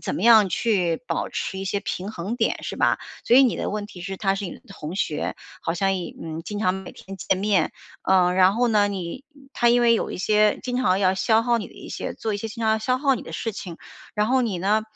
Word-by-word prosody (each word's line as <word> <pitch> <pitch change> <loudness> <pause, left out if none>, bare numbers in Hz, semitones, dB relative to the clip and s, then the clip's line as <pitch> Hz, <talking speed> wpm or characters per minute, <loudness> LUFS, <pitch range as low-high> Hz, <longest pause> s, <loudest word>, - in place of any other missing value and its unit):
怎 - - -3
么 180 - -3
样 220 -4 +7
去， 180 -4 +1
保 - - -2
持 190 - -4
一 195 - -4
些 200 +1 -1
平 195 0 -4
衡 205 +5 -4
点 - - 0
是 - - -5
吧？ - - +2 0.3
所 245 - +5
以 270 - +9
你 250 - +3
的 - - -2
问 205 0 -3
题 185 -4 -12
是 195 +2 -5
她 195 -1 +1
是 200 +1 -4
你 175 - -5
的 - - -12
同 170 -3 -7
学， 150 -6 -1 0.3
好 165 - -2
像 195 +2 +1
也 175 -3 -5
嗯， 160 0 -5
经 205 +3 -5
常 185 -3 +1
每 190 -1 -7
天 195 0 -10
见 190 - 0
面， 195 -4 +1 0.3
呃， 180 -1 +4
然 190 +1 +5
后 245 +1 +2
呢， 205 -2 +3
你 190 - -5 0.3
她 240 - +2
因 240 +1 +4
为 230 -1 +5
有 - - -1
一 - - -5
些 210 +2 +3
经 250 -1 -2
常 195 -7 +2
要 190 -1 +3
消 220 +4 +3
耗 235 0 +2
你 210 - -5
的 - - -19
一 - - -11
些 - - -5
做 220 -2 -3
一 - - -1
些 225 +2 -5
经 230 +1 -7
常 220 - +3
要 220 - +1
消 255 +3 0
耗 275 -1 +3
你 - - -6
的 - - -10
事 225 - -3
情， 175 -4 -7 0.4
然 210 0 +1
后 260 +2 +3
你 200 -7 -1
呢， 210 +4 +2
205 Hz, 290 characters per minute, -24 LUFS, 185-225 Hz, 0.4 s, 以